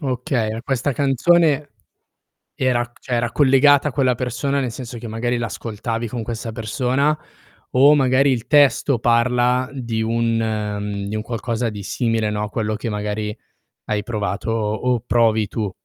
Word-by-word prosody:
Okay, 125 -5 -2
questa 135 +1 -1
canzone 145 +3 +2 0.9
era 125 -2 +1
c 120 - -25
cioè 125 - -3
era 120 0 0
collegata 145 +1 +5
a 140 - -6
quella 130 -2 +2
persona, 125 +3 -1
nel 125 -3 -2
senso 120 -1 -7
che 115 - -8
magari 120 +2 -2
l'ascoltavi 115 0 -4
con 120 +1 -4
questa 115 +1 -5
persona, 125 +6 0 0.6
o 140 +4 +6
magari 135 0 +3
il 115 -2 -2
testo 140 -2 +4
parla 125 +2 +2
di 115 -4 -3
un 115 0 0
mhmm, 105 -2 -2
di 110 - -3
un 110 - -2
qualcosa 115 +1 -2
di 105 -2 -7
simile, 115 0 0
no, 105 0 -2
quello 110 0 -2
che 110 +2 -4
magari 105 +1 -3 0.5
hai 105 -1 -1
provato 105 -1 -3
o 115 +3 0
provi 110 -3 +2
tu. 105 -1 -3
120 Hz, 155 wpm, -21 LUFS, 110-130 Hz, 0.9 s, o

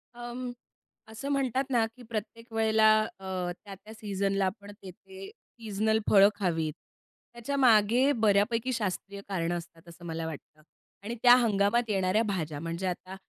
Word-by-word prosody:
अं, 240 +1 -6 0.6
असं 220 +6 -6
म्हणतात 270 -2 0
ना, 240 -4 +2
की 250 - -14
प्रत्येक 230 +1 -6
वेळेला 220 -1 +4 0.3
अ, 185 -2 -3
त्या-त्या 205 +2 -11
सीझनला 195 -2 -1
आपण 200 +2 -5
तेथे 190 +1 -11
सीजनल 220 -1 -2
फळं 200 -1 +7
खावीत. 165 -6 -1 0.6
त्याच्यामागे 240 0 +3
बऱ्यापैकी 220 +4 +2
शास्त्रीय 200 -2 -4
कारणं 175 -2 -1
असतात, 165 0 -12
असं 170 +1 -13
मला 165 -1 -4
वाटतं 155 -1 -9 0.4
आणि 230 +3 -4
त्या 245 0 +9
हंगामात 225 0 +2
येणाऱ्या 195 +2 +2
भाज्या. 160 -8 -3
म्हणजे 165 +4 -4
आता 185 +1 -5
205 Hz, 135 wpm, -28 LUFS, 185-230 Hz, 0.6 s, त्या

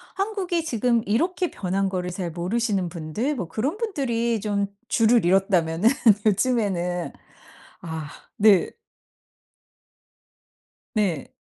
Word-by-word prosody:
한국이 385 -5 -1
지금 235 -4 +1
이렇게 345 - 0
변한 195 +1 -1
거를 180 -1 -3
잘 180 -2 -4
모르시는 190 +2 -1
분들 175 - -3
뭐 185 -9 -4
그런 270 - -2
분들이 240 - -1
좀 205 -1 0 0.2
주를 230 -1 +3
이뤘다면은 180 0 +3 0.4
요즘에는 195 -6 0 0.7
아 160 -3 -6 0.3
네. 205 -4 +5 2.2
네. 190 - -1
210 Hz, 210 characters per minute, -24 LUFS, 180-245 Hz, 2.2 s, 네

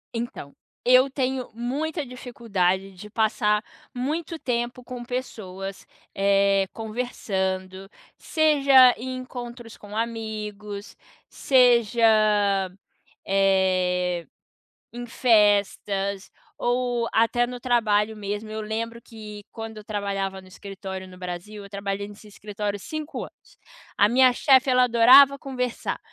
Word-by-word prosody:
Então, 230 -11 -6 0.3
eu 255 +2 +6
tenho 260 -1 -2
muita 290 +6 -3
dificuldade 205 -7 -2
de 195 +3 -11
passar 215 -1 +1 0.3
muito 310 +6 -3
tempo 245 -2 -3
com 245 0 -7
pessoas, 195 -6 -6 0.3
eh, 195 0 +2
conversando, 195 -5 -4 0.3
seja 275 -5 +5
em 255 +2 -5
encontros 240 -2 -8
com 205 +1 -9
amigos, 215 -2 -5 0.3
seja, 240 -3 +3 1.2
eh, 185 -2 +1 0.7
em 240 0 -7
festas 205 -4 +1 0.3
ou 245 -1 0
até 230 +2 +3
no 245 0 -7
trabalho 220 -3 +1
mesmo. 205 +1 -5
Eu 215 0 -4
lembro 230 +2 -4
que 215 -3 -10
quando 225 -1 -8
eu 215 - -9
trabalhava 195 -2 -3
no 185 - -17
escritório 190 0 -8
no 185 0 -13
Brasil, 180 +3 -7
eu 200 - -12
trabalhei 200 0 -4
nesse 210 +1 -14
escritório 205 0 -5
5 310 +8 -6
anos. - - -16 0.4
A 205 - +4
minha 255 +1 +5
chefe, 260 +1 +4
ela 250 0 +5
adorava 255 +4 +7
conversar 250 -3 -4
220 Hz, 115 wpm, -24 LUFS, 200-245 Hz, 1.2 s, adorava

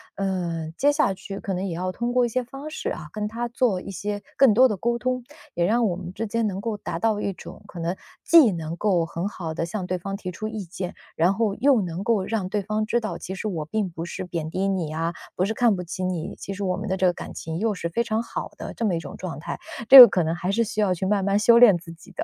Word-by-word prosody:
呃， 175 -5 -2
接 290 +1 +4
下 290 -9 +2
去 195 +1 -8
可 195 - -4
能 185 +1 -2
也 180 - -3
要 185 +2 -3
通 240 +4 -2
过 250 0 +3
一 - - -2
些 255 +2 -1
方 275 +5 -8
式 310 - -4
啊， 150 - -6
跟 210 0 -3
他 235 +2 -3
做 235 -5 +1
一 185 - -9
些 205 +1 -4
更 270 -5 +6
多 255 +5 +6
的 215 - -2
沟 235 +5 -1
通， 255 +1 -1 0.3
也 175 - 0
让 230 +4 +2
我 175 - -1
们 180 -1 -7
之 225 +3 -4
间 230 +1 0
能 195 -1 -3
够 225 +1 -3
达 170 -4 -5
到 215 0 +1
一 200 - -1
种， 175 - -11
可 175 - -9
能 170 +3 -2 0.3
既 320 -10 +7
能 165 -2 -4
够 175 -3 +1
很 170 +4 -4
好 165 -5 -6
地 165 - -2
向 180 +1 -4
对 185 - -1
方 195 +3 -5
提 185 -2 -6
出 215 +5 -5
意 215 -3 -5
见， 180 +1 -6 0.2
然 175 +4 +3
后 215 -1 0
又 270 +1 +4
能 180 +1 -4
够 210 -3 +1
让 195 -3 -2
对 205 0 -1
方 215 +2 -1
知 235 +2 +1
道， 215 -7 -4
其 190 - -6
实 215 - -4
我 165 -6 -3
并 205 +4 -2
不 165 -1 -6
是 185 +2 -5
贬 165 -3 -4
低 190 +4 -1
你 175 -6 -1
啊， 165 +1 -2 0.2
不 185 - +2
是 220 - -1
看 235 -1 +3
不 180 - -4
起 180 +2 -5
你， 180 -2 -3
其 195 - -7
实 195 - -9
我 185 -1 0
们 205 +3 -5
的 190 - 0
这 185 - +1
个 180 - +4
感 - - -8
情 160 0 -5
又 220 -1 +1
是 170 - -3
非 230 +8 0
常 225 0 -1
好 - - -5
的 - - -7
这 230 - -5
么 185 -5 +1
一 - - -1
种 145 -4 -9
状 180 -4 -6
态， 155 - -6 0.3
这 270 0 +13
个 245 - +14
可 180 - 0
能 160 +1 -1
还 180 +2 -2
是 230 +4 +2
需 215 -1 -2
要 200 - +2
去 185 +2 -3
慢 200 -1 +1
慢 200 +1 +2
修 235 +2 +6
炼 215 -7 +8
自 170 -1 -11
己 165 - -16
的。 - - -4
195 Hz, 310 characters per minute, -24 LUFS, 175-220 Hz, 0.3 s, 个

